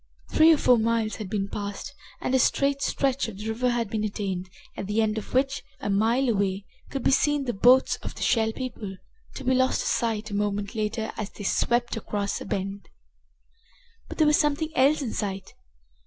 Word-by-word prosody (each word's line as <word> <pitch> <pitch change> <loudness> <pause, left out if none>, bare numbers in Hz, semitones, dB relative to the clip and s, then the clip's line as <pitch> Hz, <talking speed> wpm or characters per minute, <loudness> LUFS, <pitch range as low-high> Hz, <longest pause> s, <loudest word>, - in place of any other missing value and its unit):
Three 315 +1 +6
or 320 - +5
four 250 -4 +4
miles 225 -1 0
had 210 -4 -6
been 200 -1 -1
passed 200 +7 -5 0.3
and 255 - -1
a 260 - +4
straight 275 +2 +2
stretch 275 -2 0
of 215 -4 -8
the 210 +2 -6
river 245 +3 0
had 240 -2 0
been 215 +1 -2
attained, 195 -3 -3 0.3
at 195 - -5
the 210 +2 0
end 220 0 +1
of - - -11
which, 275 +2 +1 0.2
a 205 - -2
mile 230 +6 +2
away, 200 -3 0 0.2
could 270 -3 -4
be - - +3
seen 290 +1 +2
the 240 - -1
boats 250 +6 +5
of - - -8
the - - -4
Shell 220 -1 +2
People, 225 -7 -6 0.4
to 270 - -6
be 260 0 +2
lost 260 0 +2
to - - -4
sight 225 -3 -1
a - - -3
moment 205 0 -1
later 220 0 -2
as 210 -2 -3
they 205 - -10
swept 240 +6 +1
around 205 -2 -2
a - - -6
bend. 195 +1 -4 1.2
But - - -7
there 315 - +4
was 300 0 +5
something 300 +1 +1
else 280 +3 +4
in 235 - -3
sight. 195 -2 -4
225 Hz, 205 wpm, -26 LUFS, 205-260 Hz, 1.2 s, Three